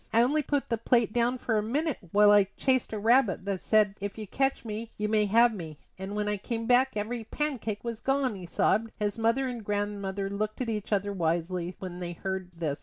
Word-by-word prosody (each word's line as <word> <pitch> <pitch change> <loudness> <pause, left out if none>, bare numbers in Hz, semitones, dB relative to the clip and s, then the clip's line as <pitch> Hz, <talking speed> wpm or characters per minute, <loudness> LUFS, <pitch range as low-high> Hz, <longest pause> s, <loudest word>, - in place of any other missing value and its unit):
"I 230 +1 +5
only 295 +5 +2
put 285 -1 -1
the 230 -2 0
plate 235 -2 +2
down 240 +1 +1
for 225 -3 0
a - - 0
minute 285 +7 -1
while 205 0 +6
I 205 -2 +6
chased 260 -2 +1
a 220 - -3
rabbit 225 -3 +3
that 195 -2 -2
said, 215 -2 +3
'If 200 +1 -4
you 215 - -5
catch 270 +4 -1
me 220 +1 -5
you 210 - -1
may 210 -1 +2
have 230 +3 +5
me;' 160 -7 -7 0.2
and 190 +2 -5
when 210 0 -1
I 210 0 0
came 230 +3 -4
back 250 +2 +4
every 225 +3 -3
pancake 235 -5 -3
was 230 -2 -4
gone," 270 -1 +1
he 185 -3 -8
sobbed. 220 +6 +1
His 210 0 -2
mother 230 +4 +2
and 240 -3 -5
grandmother 205 -1 -2
looked 210 +2 -3
at 250 -3 -2
each 210 -2 -4
other 200 0 0
wisely 175 0 -1
when 180 -2 -7
they 175 -1 -4
heard 190 +1 -4
this. 160 -4 -3
210 Hz, 225 wpm, -28 LUFS, 195-235 Hz, 0.2 s, while